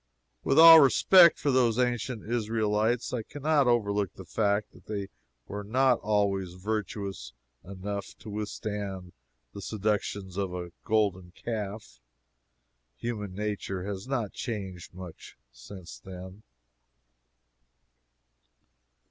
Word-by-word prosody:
With -, -, +1 dB
all 165 Hz, 0 st, +11 dB
respect 170 Hz, +5 st, +7 dB
for 145 Hz, -, 0 dB
those 120 Hz, -3 st, +3 dB
ancient 125 Hz, -2 st, -1 dB
Israelites, 110 Hz, 0 st, 0 dB
I 125 Hz, -, -1 dB
can 140 Hz, +5 st, -11 dB
not 150 Hz, -3 st, +3 dB
overlook 105 Hz, -5 st, +1 dB
the -, -, -10 dB
fact 105 Hz, -1 st, 0 dB
that 90 Hz, -, -19 dB
they 100 Hz, -2 st, -4 dB, 0.4 s
were 105 Hz, +1 st, -5 dB
not 125 Hz, +4 st, +2 dB
always 100 Hz, -4 st, 0 dB
virtuous 100 Hz, -, -4 dB, 0.3 s
enough 100 Hz, +1 st, -6 dB
to -, -, -11 dB
withstand 100 Hz, -3 st, -5 dB, 0.4 s
the 100 Hz, -, -8 dB
seductions 100 Hz, -2 st, -2 dB
of 95 Hz, -3 st, -2 dB
a 90 Hz, -1 st, -6 dB
golden 95 Hz, -5 st, 0 dB
calf. 110 Hz, -2 st, -5 dB, 1.0 s
Human 105 Hz, -5 st, -4 dB
nature 100 Hz, -2 st, -3 dB
has 100 Hz, +2 st, -5 dB
not 120 Hz, -7 st, -2 dB
changed 95 Hz, -8 st, -6 dB
much 90 Hz, -3 st, -10 dB
since 85 Hz, +9 st, -11 dB
then. 95 Hz, +1 st, -10 dB
105 Hz, 115 wpm, -28 LUFS, 95-115 Hz, 1.0 s, all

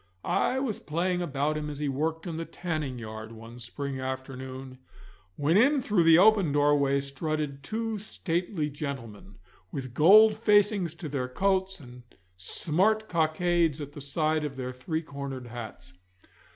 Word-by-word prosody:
I 260 Hz, -, +1 dB
was 255 Hz, -6 st, -2 dB
playing 175 Hz, +4 st, -1 dB
about 150 Hz, -2 st, -1 dB
him 150 Hz, 0 st, -4 dB
as 145 Hz, -, -6 dB
he 150 Hz, 0 st, -2 dB
worked 160 Hz, +5 st, -2 dB
in 165 Hz, -3 st, -4 dB
the 165 Hz, -, -3 dB
tanning 155 Hz, -7 st, -4 dB
yard 110 Hz, -1 st, -7 dB
one 115 Hz, +2 st, -11 dB
spring 135 Hz, +3 st, -5 dB
afternoon, 130 Hz, 0 st, -6 dB, 0.6 s
when 155 Hz, +5 st, +2 dB
in 280 Hz, +6 st, +5 dB
through 205 Hz, -9 st, +2 dB
the 165 Hz, 0 st, +8 dB
open 200 Hz, -4 st, +5 dB
doorway 145 Hz, -1 st, +3 dB
strutted 140 Hz, +1 st, -3 dB
two 220 Hz, +6 st, -3 dB
stately 175 Hz, -4 st, -2 dB
gentlemen, 125 Hz, -, -7 dB, 0.4 s
with 130 Hz, -3 st, -5 dB
gold 210 Hz, -, +7 dB
facings 205 Hz, -5 st, +3 dB
to 165 Hz, -, -6 dB
their 135 Hz, -3 st, -2 dB
coats 190 Hz, +6 st, 0 dB
and 125 Hz, -3 st, -12 dB, 0.3 s
smart 190 Hz, -, +1 dB
cockades 165 Hz, -1 st, +1 dB
at 145 Hz, -1 st, -6 dB
the 145 Hz, -, -9 dB
side 155 Hz, +2 st, 0 dB
of 145 Hz, -2 st, -4 dB
their 130 Hz, -1 st, -5 dB
three 160 Hz, +6 st, -3 dB
cornered 140 Hz, -4 st, -6 dB
hats. 110 Hz, -7 st, -9 dB
150 Hz, 150 wpm, -28 LUFS, 130-175 Hz, 0.6 s, the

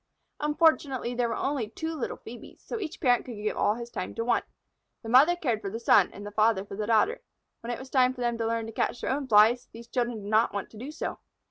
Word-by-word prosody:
Unfortunately 295 Hz, -5 st, +2 dB
there 240 Hz, -1 st, 0 dB
were -, -, -2 dB
only 270 Hz, -6 st, -2 dB
two 320 Hz, +7 st, -4 dB
little 295 Hz, -6 st, -4 dB
Phœbes, 240 Hz, +1 st, -12 dB
so 465 Hz, -, -4 dB
each 345 Hz, -6 st, -6 dB
parent 245 Hz, -5 st, +3 dB
could 245 Hz, -, -8 dB
give 210 Hz, 0 st, -3 dB
all 210 Hz, -, +2 dB
his 235 Hz, 0 st, -8 dB
time -, -, -5 dB
to 230 Hz, -, -2 dB
one. 245 Hz, -, +2 dB, 0.6 s
The 225 Hz, -, -6 dB
mother 280 Hz, +9 st, +6 dB
cared 245 Hz, -11 st, -1 dB
for 195 Hz, -, -4 dB
the 225 Hz, +4 st, -5 dB
son 205 Hz, -5 st, +5 dB
and 205 Hz, -, -10 dB
the 205 Hz, -, -6 dB
father 215 Hz, -2 st, +2 dB
for 200 Hz, -, -8 dB
the 210 Hz, +1 st, -3 dB
daughter. 230 Hz, -, +2 dB, 0.4 s
When 230 Hz, -, -8 dB
it 240 Hz, -, -3 dB
was 260 Hz, 0 st, -11 dB
time 255 Hz, -1 st, +3 dB
for 250 Hz, -, -8 dB
them 240 Hz, -1 st, 0 dB
to 225 Hz, -, 0 dB
learn 230 Hz, 0 st, -1 dB
to 225 Hz, -, -7 dB
catch 235 Hz, -, -1 dB
their -, -, -1 dB
own 275 Hz, 0 st, -2 dB
Flies, 225 Hz, +2 st, +5 dB
these 230 Hz, +1 st, -11 dB
children 240 Hz, -3 st, -2 dB
did 200 Hz, -, -6 dB
not 220 Hz, 0 st, +3 dB
want 200 Hz, -, -4 dB
to 220 Hz, -, -13 dB
do 260 Hz, +5 st, -6 dB
so. 310 Hz, -, -5 dB
235 Hz, 260 wpm, -28 LUFS, 220-265 Hz, 0.6 s, mother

